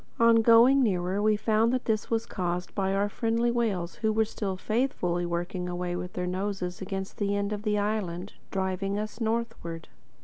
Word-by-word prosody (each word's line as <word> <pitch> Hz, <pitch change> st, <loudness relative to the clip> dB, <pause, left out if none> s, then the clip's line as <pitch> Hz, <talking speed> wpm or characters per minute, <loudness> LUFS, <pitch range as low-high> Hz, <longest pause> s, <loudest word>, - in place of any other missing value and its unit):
On 230 Hz, -1 st, +6 dB
going 235 Hz, +4 st, +6 dB
nearer, 190 Hz, -3 st, +1 dB
we 215 Hz, 0 st, +4 dB
found 220 Hz, +2 st, +2 dB
that 255 Hz, 0 st, -1 dB
this 215 Hz, -2 st, 0 dB
was 230 Hz, 0 st, 0 dB
caused 180 Hz, -3 st, -3 dB
by 195 Hz, -1 st, 0 dB
our 200 Hz, +1 st, +2 dB
friendly 230 Hz, +2 st, 0 dB
whales 205 Hz, -8 st, -1 dB
who 220 Hz, -1 st, +1 dB
were 220 Hz, +1 st, +2 dB
still 200 Hz, -3 st, -4 dB
faithfully 185 Hz, -6 st, 0 dB
working 175 Hz, +1 st, -3 dB
away 175 Hz, 0 st, -2 dB
with 180 Hz, +1 st, -5 dB
their 180 Hz, -, -2 dB
noses 185 Hz, -1 st, -3 dB
against 190 Hz, 0 st, -5 dB
the 205 Hz, -1 st, +1 dB
end 200 Hz, +1 st, -1 dB
of 205 Hz, -, -4 dB
the 210 Hz, -1 st, 0 dB
island, 205 Hz, -3 st, -2 dB, 0.2 s
driving 190 Hz, +1 st, -1 dB
us 215 Hz, +2 st, -5 dB
northward. 225 Hz, -8 st, -3 dB
205 Hz, 180 wpm, -28 LUFS, 180-225 Hz, 0.2 s, On